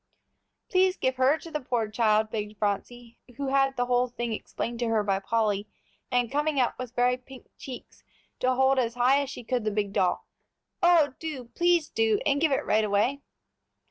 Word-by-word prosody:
"Please 375 0 +2
give 260 0 -1
her 265 +4 +4
to 330 - -11
the 300 - -2
poor 245 -5 -1
child," 215 0 +1
begged 210 -1 -4
Phronsie, 230 +3 -3 0.2
who 280 -1 -2
had 270 -1 +2
the 245 - +1
whole 245 0 +2
thing 240 -1 -4
explained 235 +2 -5
to 240 - 0
her 225 -2 +1
by 195 -1 0
Polly, 210 0 0 0.4
and 245 -2 0
coming 295 0 0
up 250 - +2
with 250 -1 -7
very 245 +1 +2
pink 255 0 -14
cheeks 255 -2 -10 0.4
to 255 0 +1
hold 265 +1 +3
as 235 -2 -1
high 255 +3 +4
as 280 - -4
she 245 - -8
could 245 0 -1
the 215 - 0
big 205 -1 -2
doll. 180 -2 +1 0.6
"Oh, 335 -6 +4
do, 275 -7 -6
please 345 -3 +2
do, 220 -1 +1
and 285 0 +2
give 320 -2 +3
it 270 - 0
right 215 +1 +2
away." 215 +7 +1
245 Hz, 195 wpm, -27 LUFS, 220-270 Hz, 0.6 s, her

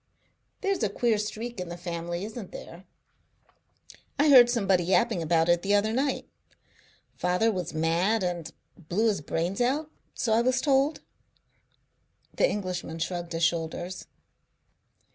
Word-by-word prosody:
"There's 395 -5 0
a 215 - +1
queer 220 +1 +1
streak 220 +1 -5
in 180 -1 -5
the 175 - -6
family, 170 +1 -4
isn't 215 -2 -8
there? 175 +3 -10 1.3
I 295 +1 +4
heard 250 -4 +9
somebody 195 -7 +2
yapping 180 -1 +2
about 165 0 +2
it 175 0 +3
the 200 +2 +2
other 215 +2 +1
night. 270 +3 -1 0.9
Father 180 +6 +1
was 180 -5 -4
mad 175 +7 +1
and 175 -3 -3 0.2
blew 185 +7 0
his 200 -7 -1
brains 170 +8 -2
out, 295 +5 0 0.2
so 225 - 0
I 225 - +4
was 255 +1 +2
told." 275 +2 +2 1.3
The - - +2
Englishman 180 -5 -4
shrugged 170 0 -4
his 165 +1 -2
shoulders. 170 +2 -2
190 Hz, 140 wpm, -27 LUFS, 175-235 Hz, 1.3 s, heard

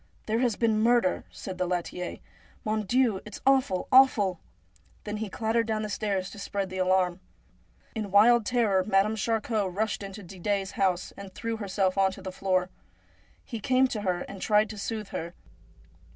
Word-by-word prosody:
' - - -34
There 220 +1 0
has 240 -4 +1
been 225 -2 +2
murder,' 235 -5 +2
said 185 -2 -8
the 180 - 0
laitier. 180 0 -3 0.2
' - - -29
Mon 215 -1 -1
Dieu! 240 -3 +2
it's 215 - -9
awful, 260 -9 +2
awful! 215 -9 +5 0.3
' - - -33
Then 210 0 -4
he 215 -1 -4
clattered 225 +3 0
down 215 -1 -1
the 215 - -3
stairs 195 -2 -2
to 205 - -10
spread 200 -1 -3
the 185 - -4
alarm. 185 -1 +2 0.7
In 215 -3 -4
wild 225 +4 +6
terror, 210 -5 +2
Madame 205 +2 +2
Charcot 220 -2 -1
rushed 210 +4 -1
into 200 +1 -8
Didet' 195 +3 -2
s 190 - -7
house, 185 -2 0
and 200 -1 -9
threw 230 0 -3
herself 195 -2 0
on 190 0 +4
to 195 - -10
the 190 - -5
floor. 185 -1 0 0.7
He 230 - -5
came 255 +4 +3
to 215 - -3
her 180 -3 -1
and 195 0 -8
tried 210 0 +3
to 215 - -8
soothe 215 -1 -4
her. 170 +2 -5
205 Hz, 190 wpm, -28 LUFS, 190-220 Hz, 0.7 s, wild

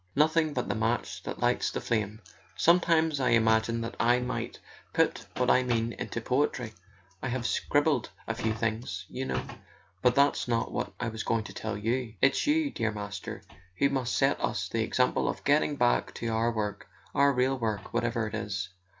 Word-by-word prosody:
"Nothing 155 +1 +3
but 125 - -1
the - - 0
match 115 +1 -1
that - - -6
lights - - +2
the - - -3
flame! 110 -1 -1 0.3
Sometimes 165 -3 +3
I 130 - +2
imagine 115 0 +3
that 115 0 -4
I 120 +1 +4
might 125 0 -3 0.4
put - - +1
what 125 0 +3
I 130 - +5
mean 120 -2 0
into - - -4
poetry... 125 -2 0 0.5
I - - -2
have 125 0 -2
scribbled 145 -2 +1 0.2
a 115 - 0
few 110 -1 -1
things, 110 -4 -2
you 130 +1 -4
know... - - -2 0.6
but 125 +3 +4
that's 140 -2 +3
not 115 -1 0
what 120 - -2
I 120 - -1
was 110 0 -5
going 115 -1 0
to - - -9
tell 110 -1 -4
you. 115 +2 -1
It's 135 - +3
you, 300 -1 +2
dear 115 -1 -1
Master, 100 -2 -6 0.3
who 140 - +3
must 130 -3 0
set - - +2
us - - -1
the - - 0
example - - +1
of - - -4
getting 145 0 +3
back 120 -2 +1
to 115 - -4
our 115 +1 +1
work, 105 -3 -3 0.3
our 140 0 +5
real 130 0 +1
work, 110 -3 -3
whatever 120 -1 0
it 110 - -8
is. 100 -4 -3
120 Hz, 190 wpm, -29 LUFS, 110-130 Hz, 0.6 s, I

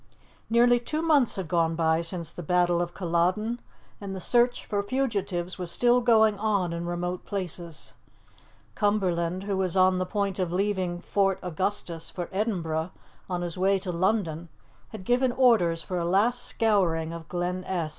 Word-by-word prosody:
Nearly 240 +1 +5
two 305 +6 -3
months 295 -7 +3
had 190 -4 -4
gone 165 -1 +1
by 160 0 +2
since 170 -1 -4
the - - -7
Battle 175 +1 +2
of 175 0 -4
Culloden, 185 +6 0 0.4
and 195 -1 -5
the - - -5
search 240 +5 +2
for 205 -2 -1
fugitives 200 -7 -2
was 180 -2 -4
still 245 +7 +3
going 220 -3 +4
on 200 -5 0
in 170 0 -4
remote 175 +1 -3
places. 175 -4 -5 0.8
Cumberland, 185 -4 0
who 200 -1 -2
was 190 -1 -1
on 185 0 +4
the 185 - -1
point 200 -1 -2
of 180 -2 -1
leaving 185 -2 -1
Fort 195 0 +1
Augustus 180 -1 -3
for 175 -2 -5
Edinburgh 175 -6 -1 0.4
on 175 -1 -2
his 175 0 -5
way 195 +1 +3
to 185 -1 -4
London, 170 -3 -1 0.4
had 210 -4 -9
given 250 +2 +2
orders 215 -11 +3
for 180 +1 -3
a - - -1
last 205 +8 +1
scouring 170 -7 +1
of 165 -1 -9
Glen 180 +2 -2
Esk. 170 -4 -2
185 Hz, 165 wpm, -27 LUFS, 175-210 Hz, 0.8 s, Nearly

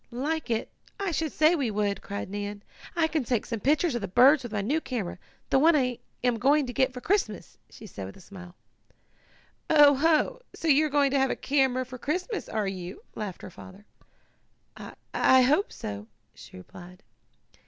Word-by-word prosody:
"Like 285 +5 -3
it! 225 -1 -2 0.3
I 395 -3 -1
should 315 -1 -2
say 310 +2 +4
we 280 -8 0
would!" 205 -1 -1
cried 200 0 -5
Nan. 205 +1 -6 0.3
"I 335 -2 +3
can 315 -3 -1
take 240 -2 -1
some 230 -2 -4
pictures 295 - +1
of 240 - -2
the 200 - -3
birds 260 +9 +5
with 240 -3 -8
my 210 -2 -1
new 285 +11 0
camera 210 - -4 0.3
the 270 - +4
one 320 +3 +5
I 250 -4 0 0.2
am 245 -2 +1
going 285 +4 +3
to 245 - -6
get 260 0 +2
for 250 -1 -9
Christmas," 400 +8 -2
she 220 - -13
added 100 - -8
with 95 - -12
a - - -15
smile. 180 -2 -12 1.1
"Oh 295 -2 +7
ho! 320 - +1
So 330 - -5
you 305 +1 +4
are - - -7
going 285 -1 +2
to 275 - +2
have 265 0 +2
a - - -1
camera 265 -2 +1
for 255 0 -10
Christmas; 365 - -3
are 215 -2 -1
you?" 185 -1 -7
laughed 205 -4 -6
her - - -8
father. 190 +4 -13 0.9
"I - - -10 0.2
I 260 0 +5
hope 300 +11 +2
so," 100 +1 -7 0.3
she - - -13
replied. 180 - -13
255 Hz, 195 wpm, -27 LUFS, 205-300 Hz, 1.1 s, Oh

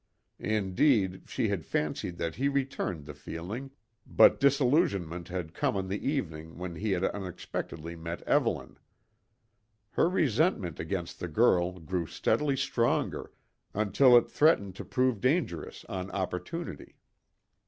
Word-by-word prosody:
Indeed, 100 -1 +1
she - - 0
had - - -1
fancied 75 +3 -2
that 85 -1 -2
he 135 +3 0
returned 135 - -2
the 75 - -8
feeling, 100 - -6 0.4
but - - +6
disillusionment 125 - +2
had 90 -3 -5
come - - 0
on 95 -1 -3
the 100 +2 -3
evening 80 - -3
when 90 0 -5
he 100 +4 -1
had 90 0 -1
unexpectedly 90 -4 -4
met 85 +1 -6
Evelyn. - - 0 1.1
Her - - +3
resentment 145 - +1
against 85 +1 -4
the 90 - -3
girl 90 -1 +2
grew 85 0 -2
steadily 145 - +1
stronger, 135 -3 0 0.4
until 110 +5 +6
it 120 - +3
threatened 100 - +3
to - - -6
prove 130 -4 +1
dangerous 130 - -1
on 95 0 -5
opportunity. 95 - -4
95 Hz, 130 wpm, -29 LUFS, 85-130 Hz, 1.1 s, but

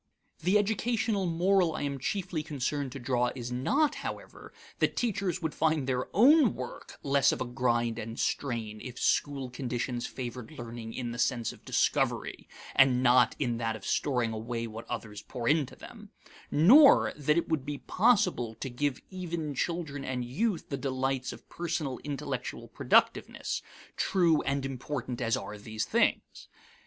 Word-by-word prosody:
The 185 +5 +3
educational 220 -1 0
moral 175 0 +2
I - - -3
am 140 -1 -2
chiefly 175 +1 -2
concerned 145 -2 -2
to 140 - -6
draw 125 -1 +1
is 125 -1 -5
not, 270 - +2
however, - - -7 0.3
that - - +1
teachers 190 -6 -1
would 160 - -1
find 160 -3 +1
their 130 -1 -1
own 260 - +6
work 125 -1 -8
less 140 0 +4
of - - -3
a 130 - -1
grind 120 -2 0
and 115 +1 -6
strain 115 -5 -2
if 125 -1 -8
school 135 -3 0
conditions 125 -1 -3
favored 125 +2 -7
learning 115 -1 -7
in 120 -2 -3
the 120 - -6
sense 120 -2 0
of - - -18
discovery - - 0 0.3
and 130 -2 +5
not 125 0 +5
in 120 -5 -1
that 115 -1 -1
of 105 - -10
storing 125 -5 0
away 115 +1 -3
what 115 0 -8
others 110 -3 -5
pour 120 +2 -5
into 150 -3 +2
them; - - -12 0.4
nor 260 - +7
that 150 +2 +1
it 170 - +1
would 160 -4 0
be 145 +1 -4
possible 185 - +2
to 135 - -6
give 140 +2 -1
even 170 -5 -4
children 145 -1 -2
and 125 -2 -3
youth 175 - -1
the 140 - -2
delights 130 -1 -1
of - - -12
personal 160 -6 -3
intellectual 145 -2 -4
productiveness - - +1 0.3
true 170 -5 +3
and 140 0 0
important 130 -1 -4
as 115 -2 +1
are 105 0 -7
these 110 +1 -3
things. - - 0
135 Hz, 160 wpm, -29 LUFS, 120-165 Hz, 0.4 s, nor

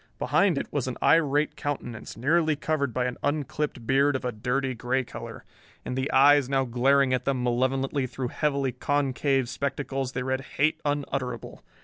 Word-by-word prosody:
Behind 195 -7 +2
it - - -1
was 140 -3 -1
an 130 - -4
irate 150 -2 +3
countenance, 125 -8 -5
nearly 155 +5 +2
covered 145 -2 -1
by 125 +2 -1
an 125 -1 -3
unclipped 145 -3 -2
beard 140 +3 +3
of 130 - -3
a 125 - 0
dirty 125 +4 -1
gray 125 +2 -1
color. - - -9 0.4
In - - -3
the 130 +2 -2
eyes 140 0 +5
now 135 -1 +2
glaring 130 +2 +3
at 130 - -1
them 130 -2 0
malevolently 130 +2 0
through 125 0 -4
heavily 140 -3 0
concaved 135 -1 0
spectacles 135 0 -3
they 125 - -2
read 130 +1 -1 0.2
hate 155 +3 +2
unutterable. 135 -4 -3
135 Hz, 165 wpm, -26 LUFS, 125-145 Hz, 0.4 s, eyes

